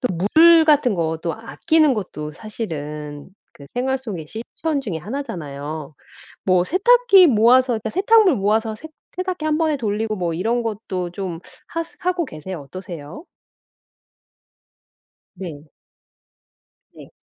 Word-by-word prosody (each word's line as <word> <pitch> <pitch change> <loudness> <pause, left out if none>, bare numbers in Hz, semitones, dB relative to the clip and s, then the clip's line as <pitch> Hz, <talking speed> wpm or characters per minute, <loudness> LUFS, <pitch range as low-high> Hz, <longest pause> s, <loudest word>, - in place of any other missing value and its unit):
또 250 - 0 0.3
물 335 0 +8
같은 290 -7 +4
거 160 -2 -1
또 170 - -1
아끼는 305 +7 +2
것도 150 -8 -5
사실은 150 -7 -6 0.2
그 140 - -14
생활 265 +2 0
속의 200 -12 -6
실천 280 +7 -3
중에 200 -11 -4
하나잖아요. 155 - -6 0.5
뭐 185 -1 +3
세탁기 400 - +5
모아서 250 +2 +5
그니까 220 0 -3
세탁물 405 -1 +4
모아서 215 +2 +1
세 275 - -10 0.3
세탁기 365 -3 -3
1 305 0 +2
번에 315 -2 +1
돌리고 215 -1 -1
뭐 175 -3 -2
이런 230 +7 0
것도 195 -5 -4
좀 175 -2 -5 0.3
하스 330 0 -5
하고 360 -1 0
계세요. 170 - -7
어떠세요? 170 - -9 2.1
네. 160 -5 -9 1.2
네. - - -14
220 Hz, 250 characters per minute, -21 LUFS, -, 2.1 s, 물